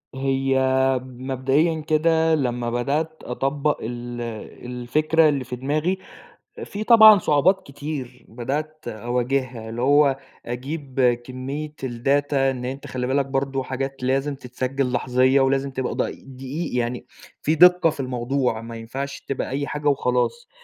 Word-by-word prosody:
هي 135 0 +1 0.4
مبدئيًا 135 +5 0
كده 160 +1 +2
لمّا 125 -4 -1
بدأت 145 +7 -2
أطبّق 140 +4 -1
ال 120 +1 -5 0.4
الفكرة 150 +6 +2
اللي 140 -3 -1
في 125 0 -6
دماغي، 150 +8 -1 0.7
في 205 +1 -5
طبعًا 220 -2 +9
صعوبات 180 +4 +2
كتير 140 -3 -6
بدأت 150 +6 -4
أواجهها، 120 +1 -2
اللي 115 +2 -4
هو 140 0 +4 0.3
أجيب 130 -1 -1
كمية 135 +4 -5
الData 135 +4 0
إن 135 -2 +1
أنت 135 +2 -5
خلِّ 125 -1 -3
بالك 135 +1 +1
برضه 135 0 -1
حاجات 135 +1 -4
لازم 135 +3 0
تتسجل 130 0 -3
لحظية، 130 +2 +3
ولازم 135 +1 +1
تبقى 130 -1 -3
د - - -8 0.4
دقيِق 135 +3 -4
يعني 120 0 -2 0.4
في 155 - +2
دقة 180 0 +6
في 150 - -8
الموضوع، 125 -2 -1
ما 115 0 -8
ينفعش 135 +5 -5
تبقى 135 - -2
أي 140 +2 -2
حاجة 150 0 -2
وخلاص، 140 - 0
135 Hz, 135 wpm, -23 LUFS, 125-150 Hz, 0.7 s, طبعًا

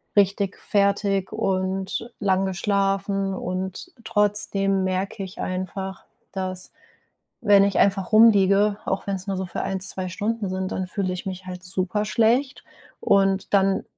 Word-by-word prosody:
richtig 200 -1 +2
fertig 200 -1 +1
und 190 +3 -2
lang 195 -1 +2
geschlafen 195 0 0
und 185 - -4
trotzdem 200 -2 +1
merke 195 +3 -2
ich 190 -1 -9
einfach, 185 +1 -4 0.3
dass 185 -1 -3 0.7
wenn 205 -3 +6
ich 200 -1 +1
einfach 195 -2 +2
rumliege, 205 -2 +5
auch 190 - -2
wenn 200 - -1
es 190 +1 -7
nur 195 - -1
so 190 0 -3
für 175 - -4
1, 195 0 -2
2 185 -1 -2
Stunden 210 +3 -2
sind, 185 0 -3
dann 185 -1 -3
fühle 185 -1 -2
ich 180 - -5
mich 190 -1 -6
halt 180 -1 -7
super 185 +3 -1
schlecht. 240 +5 +1 0.3
Und, 195 0 +2
dann 195 0 +3
195 Hz, 145 wpm, -24 LUFS, 185-200 Hz, 0.7 s, wenn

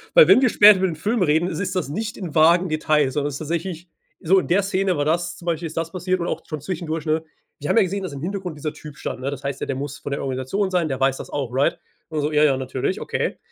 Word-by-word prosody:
Weil, - - +9
wenn 255 - +7
wir 255 - +4
später 210 -1 +8
über 190 - +2
den 170 - -4
Film 210 +8 -1
reden, 160 +1 +2
ist - - -4
es 190 -2 -2
das 185 -5 -2
nicht 215 +8 -4
in 175 -6 -7
vagen 170 +3 +5
Details, 155 -3 +1
sondern 145 +1 -1
ist 140 - -5
tatsächlich 170 +2 -4 0.3
so: 185 +4 +3
„In - - -4
der 195 +4 +3
Szene 190 -1 0
war 145 - 0
das, 170 +3 0
zum 175 - -13
Beispiel 170 -1 -1
ist 160 - -10
das 165 0 -2
passiert”, 185 0 -1
und 170 - -2
auch - - -3
schon 155 -2 -6
zwischendurch, 165 -1 -4
ne? 155 0 0 0.4
„Wir 145 - -5
haben - - +3
ja 225 - +7
gesehen, 195 +2 -3
dass 185 - -4
im 140 - -7
Hintergrund 180 -2 -4
dieser 150 +1 -4
Typ 150 -2 -11
stand, - - -5
ne? 135 +2 -2
Das 140 0 -7
heißt 140 -1 -4
ja, - - -2
der 135 - -2
muss 140 +2 -5
von 145 - -6
der 140 - -2
Organisation 135 +10 -2
sein, 180 -3 +1
der 135 -2 -3
weiß 135 0 +2
das - - -8
auch“, 140 -4 -3
right? 145 +6 +2 0.3
Und 155 -2 -2
so 150 +1 -1
„ja, 150 0 +3
ja, 140 -3 +4
natürlich. 130 -1 -2
Okay. - - -2
160 Hz, 290 wpm, -22 LUFS, 145-185 Hz, 0.4 s, Weil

